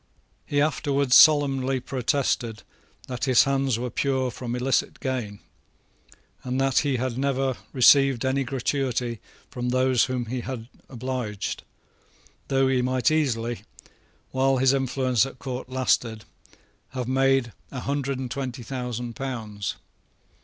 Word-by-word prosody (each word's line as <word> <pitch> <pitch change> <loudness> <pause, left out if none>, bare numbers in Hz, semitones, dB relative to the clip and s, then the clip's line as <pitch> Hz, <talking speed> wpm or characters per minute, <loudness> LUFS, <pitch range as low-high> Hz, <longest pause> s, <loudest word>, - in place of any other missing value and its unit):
He 145 - 0
afterwards 140 -3 +2
solemnly 135 -4 +5
protested 125 -3 -1 0.4
that 125 +1 -3
his 130 -3 +5
hands 135 -3 +1
were 125 +1 -4
pure 130 -2 0
from 120 0 -5
illicit 125 0 0
gain, 120 -6 -3 1.0
and 130 +1 -2
that 135 -1 +3
he 140 -3 0
had 125 0 -2
never 135 -1 0 0.2
received 135 0 +5
any 135 +1 +1
gratuity 125 -2 -2 0.3
from 125 0 -3
those 130 -1 +3
whom 125 -1 -2
he 125 +2 -3
had 120 -2 -6 0.2
obliged, 125 -5 -4 0.9
though 135 -1 +2
he 130 -1 +2
might 130 +4 +1
easily, 120 -7 0 0.7
while 135 0 +2
his 130 +1 +4
influence 130 -3 +1
at 135 - -11
court 130 -1 -6
lasted, 125 -4 0 0.7
have 125 -2 -3
made 135 -3 +2 0.2
a 130 - -6
hundred 140 -1 -2
and 130 -2 -5
twenty 130 -1 -4
thousand 120 -1 -4
pounds. 110 -7 -4
130 Hz, 130 wpm, -25 LUFS, 120-135 Hz, 1.0 s, solemnly